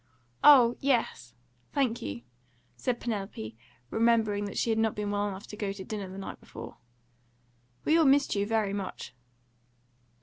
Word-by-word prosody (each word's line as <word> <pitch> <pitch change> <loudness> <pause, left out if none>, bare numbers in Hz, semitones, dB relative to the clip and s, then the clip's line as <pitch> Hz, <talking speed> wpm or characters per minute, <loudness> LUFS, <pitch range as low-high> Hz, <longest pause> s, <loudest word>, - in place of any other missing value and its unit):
"Oh 250 -5 +8
yes, 230 - 0 0.4
thank 255 -5 +1
you," 100 +4 -5 0.5
said 250 -2 -2
Penelope, 195 - -4 0.4
remembering 220 -3 +2
that 200 - -6
she 230 - +1
had 220 - +1
not 220 -1 +1
been 210 -1 -2
well 205 0 0
enough 195 0 -6
to - - -9
go 205 -2 -2
to 195 -1 -7
dinner 200 -2 -5
the 190 - -9
night 195 - -7
before. - - -10 1.1
"We 320 +2 +4
all 320 - +5
missed 280 +1 +4
you 200 0 0
very 215 -3 +1
much." 195 -9 -5
210 Hz, 160 wpm, -29 LUFS, 195-235 Hz, 1.1 s, Oh